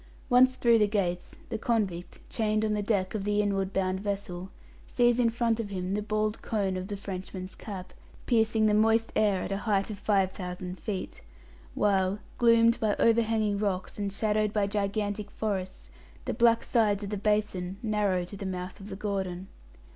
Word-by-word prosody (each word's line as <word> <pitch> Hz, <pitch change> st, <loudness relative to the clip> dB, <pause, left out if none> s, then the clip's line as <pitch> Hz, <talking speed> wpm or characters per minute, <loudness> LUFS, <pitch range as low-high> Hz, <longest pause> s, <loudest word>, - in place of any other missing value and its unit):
Once 255 Hz, +1 st, +6 dB
through 235 Hz, -2 st, +4 dB
the 210 Hz, -, +4 dB
gates, 180 Hz, -4 st, -2 dB
the 220 Hz, -, -3 dB
convict, 200 Hz, -7 st, -1 dB
chained 215 Hz, -1 st, 0 dB
on 215 Hz, -, 0 dB
the 210 Hz, -, 0 dB
deck 200 Hz, -3 st, 0 dB
of 215 Hz, -3 st, -2 dB
the 205 Hz, 0 st, +1 dB
inward 195 Hz, -2 st, 0 dB
bound 190 Hz, -1 st, 0 dB
vessel, 195 Hz, -2 st, -4 dB, 0.4 s
sees 240 Hz, 0 st, +3 dB
in 235 Hz, -2 st, +4 dB
front 230 Hz, 0 st, 0 dB
of 220 Hz, -3 st, -3 dB
him 185 Hz, -1 st, -3 dB
the 205 Hz, +1 st, 0 dB
bald 215 Hz, +1 st, -1 dB
cone 200 Hz, -4 st, -1 dB
of 185 Hz, 0 st, -4 dB
the 205 Hz, -1 st, -4 dB
Frenchman's 185 Hz, -1 st, -6 dB
Cap, 190 Hz, -4 st, -8 dB, 0.3 s
piercing 220 Hz, -2 st, +3 dB
the 210 Hz, -, +3 dB
moist 225 Hz, +1 st, +3 dB
air 205 Hz, -3 st, +2 dB
at -, -, -5 dB
a 195 Hz, -, 0 dB
height 205 Hz, -1 st, 0 dB
of 200 Hz, -, -7 dB
five 195 Hz, -2 st, +2 dB
thousand 180 Hz, -1 st, -6 dB
feet; 195 Hz, -4 st, -5 dB, 0.5 s
while, 195 Hz, -1 st, +2 dB, 0.2 s
gloomed 230 Hz, -1 st, +5 dB
by 215 Hz, -2 st, +1 dB
overhanging 220 Hz, -3 st, +2 dB
rocks, 195 Hz, -1 st, -2 dB
and 200 Hz, -1 st, -2 dB
shadowed 215 Hz, +1 st, 0 dB
by 210 Hz, -2 st, +1 dB
gigantic 205 Hz, 0 st, -2 dB
forests, 195 Hz, -4 st, -4 dB, 0.3 s
the -, -, -1 dB
black 235 Hz, -1 st, +4 dB
sides 210 Hz, -4 st, +2 dB
of 200 Hz, -, -5 dB
the -, -, -1 dB
basin 200 Hz, -3 st, -1 dB
narrow 205 Hz, -4 st, +1 dB
to 180 Hz, +3 st, -8 dB
the 195 Hz, -, -7 dB
mouth 185 Hz, 0 st, -5 dB
of 200 Hz, +1 st, -10 dB
the 195 Hz, -, -5 dB
Gordon. 190 Hz, -2 st, -3 dB
205 Hz, 185 wpm, -28 LUFS, 190-220 Hz, 0.5 s, Once